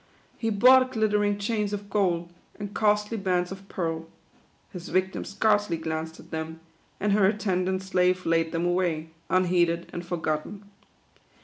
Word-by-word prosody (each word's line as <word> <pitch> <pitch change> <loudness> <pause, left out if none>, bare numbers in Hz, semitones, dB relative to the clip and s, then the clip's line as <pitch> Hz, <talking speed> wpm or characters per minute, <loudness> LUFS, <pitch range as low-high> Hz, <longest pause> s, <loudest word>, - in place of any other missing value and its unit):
He 225 - -2
bought 255 +4 +6
glitter 215 -2 +2
ing 205 0 +1
chains 210 0 -1
of 205 0 -4
gold, 175 -4 0 0.2
and 205 -1 -6
costly 210 +1 +1
bands 180 -3 0
of 195 0 -9
pearl. 165 -2 -3 0.6
His 180 -3 -8
victim 185 +1 0
scarcely 205 -3 +1
glanced 160 0 -4
at - - -15
them, 160 0 -5 0.4
and 210 +1 +1
her 200 -2 +5
attendant 190 -2 0
slave 185 -1 +1
laid 165 -1 +2
them 170 0 -1
away, 175 -3 0 0.2
unheeded 175 -2 +2
and 175 - -4
forgotten. 170 +3 -3
185 Hz, 145 wpm, -26 LUFS, 170-205 Hz, 0.6 s, bought